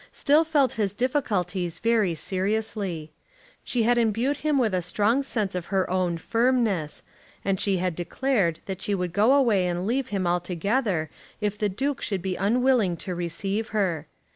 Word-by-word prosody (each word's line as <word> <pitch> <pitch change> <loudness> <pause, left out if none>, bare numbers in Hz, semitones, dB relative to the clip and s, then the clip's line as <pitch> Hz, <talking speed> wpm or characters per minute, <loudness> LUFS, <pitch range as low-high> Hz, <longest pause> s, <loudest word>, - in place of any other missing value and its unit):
still 300 +3 +3
felt 290 -6 +2
his 200 -2 0
difficulties 195 - -1
very 220 -6 +2
seriously. 190 -2 -2 0.5
She 240 -3 0
had 240 +1 +3
imbued 235 +5 +1
him 300 -1 +1
with 230 -6 +2
a 180 - +1
strong 215 +9 +1
sense 220 -8 -2
of 180 -2 -4
her 190 -2 +1
own 180 -2 0
firmness, 225 -6 0 0.4
and 195 -1 +1
she 195 -2 +2
had 180 -1 -1
declared 180 -1 0
that 190 -1 -5
she 205 - 0
would 180 -2 -3
go 215 +6 +4
away 220 -10 +3
and 175 +1 -2
leave 250 +4 0
him 195 -2 -2
altogether 175 - 0 0.3
if 210 -1 -1
the 210 0 0
Duke 270 +8 -2
should 195 -4 -2
be 190 -1 -1
unwilling 225 -2 +2
to 185 - -5
receive 195 +5 -2
her. 175 -9 -1
200 Hz, 165 wpm, -25 LUFS, 180-235 Hz, 0.5 s, go